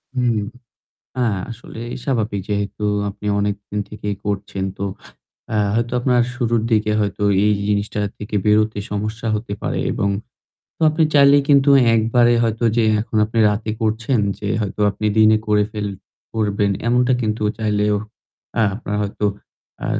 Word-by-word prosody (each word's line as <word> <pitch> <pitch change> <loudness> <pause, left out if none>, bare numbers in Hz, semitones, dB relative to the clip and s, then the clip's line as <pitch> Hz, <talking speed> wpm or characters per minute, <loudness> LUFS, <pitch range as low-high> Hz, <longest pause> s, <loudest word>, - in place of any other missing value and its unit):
হুম। 120 -3 +1 0.8
হ্যাঁ, 110 -6 +1
আসলে 115 0 -10 0.2
স্বাভাবিক। 110 -6 -1
যেহেতু 100 0 -2 0.3
আপনি 105 - -10
অনেকদিন 105 0 -2
থেকেই 105 -1 -4
করছেন, 100 -1 -3
তো - - -4 0.7
আ - - +2 0.2
হয়তো 115 +1 0
আপনার 125 -1 +3
শুরুর 120 -3 0
দিকে 105 -1 +2
হয়তো 105 0 -2 0.2
এই 105 - +4 0.2
জিনিসটা 105 0 -1 0.2
থেকে 105 0 -4
বেরোতে 105 0 +3
সমস্যা 110 +3 -3
হতে 105 -1 -4
পারে - - -2
এবং 100 - 0 0.8
আপনি 155 +1 +1
চাইলে 140 0 +7
কিন্তু 140 0 +5 0.3
একবারে 120 +2 +3
হয়তো 115 +1 -1
যে 115 - +4 0.2
এখন 110 -1 -3
আপনি 115 +2 -2
রাতে 105 +1 -2
করছেন 115 +3 0 0.2
যে 105 - -4
হয়তো 105 0 -3
আপনি 105 - -5
দিনে 110 0 +6
করে 105 -1 +3
ফেল 105 -2 -3 0.5
করবেন 105 -2 0 0.2
এমনটা 125 +1 +3
কিন্তু 110 -1 -2 0.2
চাইলেও 105 -1 +1 0.6
আ - - +4
আপনার 105 -1 -4
হয়তো 105 +1 -2 0.6
আ - - -1
110 Hz, 145 wpm, -20 LUFS, 105-115 Hz, 0.8 s, চাইলে